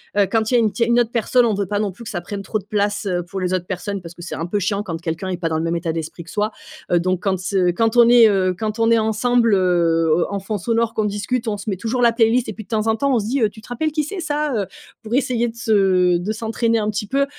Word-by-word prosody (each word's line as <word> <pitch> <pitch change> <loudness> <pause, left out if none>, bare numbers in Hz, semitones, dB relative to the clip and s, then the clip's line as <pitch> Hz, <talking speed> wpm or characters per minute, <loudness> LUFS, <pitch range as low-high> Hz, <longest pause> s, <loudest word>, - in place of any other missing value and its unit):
heu, 200 -1 +3
quand 220 0 +1
il - - -1
y - - +6
a - - +5
une 220 -2 +2
tier 230 - 0
il - - -3
y - - +3
a - - +4
une 240 - +4
autre 235 -2 +1
personne, 245 +1 +2
on 225 -3 +1
veut 200 0 -1
pas 205 +2 -2
non 205 -2 -1
plus 205 +6 -12
que 225 - -7
ça 175 - -3
prenne 200 +3 -6
trop 215 +2 -2
de 195 - -15
place, 205 0 -1
heu, 175 -2 -1
pour 190 +2 -5
les 180 -1 -1
autres 180 -1 -3
personnes 195 +2 -4
parce 170 0 -9
que 175 - -13
c'est 170 - -6
un 165 - -3
peu 205 +4 -1
chiant 200 +1 -1
quand 165 -5 -5
quelqu'un 165 +2 -3
est 180 - -2
pas 170 -1 -2
dans 160 - -1
le 160 - -2
même 165 +1 -1
état 170 -1 -2
d'esprit 165 +1 -6
que 165 - -15
soi. 210 +1 -1 0.4
Heu 175 - +4
donc 185 +1 -1
quand, 195 - +1
s 185 +2 -4
heu, 180 -2 +3
quand 225 +2 +1
on 235 -1 +7
est, 240 -2 +7
heu, 190 -2 +1
quand 215 +3 -3
on 230 0 +2
est 230 - +5
ensemble, 225 +1 +2
heu, 170 -3 +2
en 200 - -3
en - - -3
fond 205 +2 -4
sonore, 230 +3 0
qu'on 215 -2 0
discute, 210 +4 -2
on 210 -2 -1
se 205 - -10
met 195 -3 -1
toujours 235 +5 -1
la 235 - +6
playlist 230 +1 +2
et - - -4
puis 220 - -9
de - - -29
temps 215 -1 0
en 225 0 +2
temps, 280 +5 0
on - - +3
se 205 - -4
dit, 260 +4 -1
heu: 220 - +3
«Tu 215 - -15
te - - -16
rappelles 310 +6 -1
qui 305 0 0
c'est 365 +6 -6
ça, 300 -3 -1
heu?» 200 -3 -1 0.3
pour 225 +2 -3
essayer 245 -3 +1
de 230 - -7
se 190 -6 +3
de 190 +5 -3
s'entraîner 230 +1 0
un 215 -1 0
petit 210 0 -3
peu. 275 +5 +1
210 Hz, 340 wpm, -20 LUFS, 185-230 Hz, 0.4 s, on